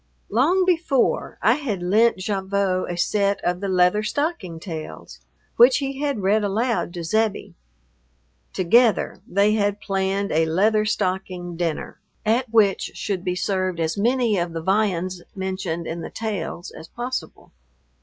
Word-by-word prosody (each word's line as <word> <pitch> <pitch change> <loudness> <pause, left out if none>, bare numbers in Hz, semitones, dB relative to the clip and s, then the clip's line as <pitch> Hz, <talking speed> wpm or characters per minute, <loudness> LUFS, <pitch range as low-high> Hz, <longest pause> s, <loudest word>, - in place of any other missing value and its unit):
Long 330 - +3
before 330 -7 +1
I - - +6
had 220 -12 -3
lent 215 +6 +3
Gavotte 195 -2 -1
a 175 - -4
set 200 +2 +1
of 180 0 0
the 200 - -2
Leather 185 +2 +3
Stocking 215 - -2
Tales, 160 -3 -8 0.4
which 245 +2 +7
he 275 -1 -3
had 280 -7 -1
read 210 +3 +3
aloud 220 0 0
to 170 - -4
Zebbie. 215 +4 -1 1.0
Together 220 +3 +2
they 200 +3 +3
had 205 -1 0
planned 195 0 -1
a 160 +1 +2
Leather 210 +6 +2
Stocking 185 -3 -2
dinner, 165 -2 -3 0.3
at 235 +3 +1
which 210 -4 +2
should 190 -3 -3
be 180 -2 -1
served 185 -1 -1
as 160 -1 0
many 235 -1 +1
of 170 -1 -2
the 165 - -4
viands 185 -2 0
mentioned 190 -3 -3
in 165 +1 -4
the - - -6
Tales 200 -6 -4
as 160 - -11
possible. 245 +6 -6
200 Hz, 145 wpm, -23 LUFS, 180-220 Hz, 1.0 s, which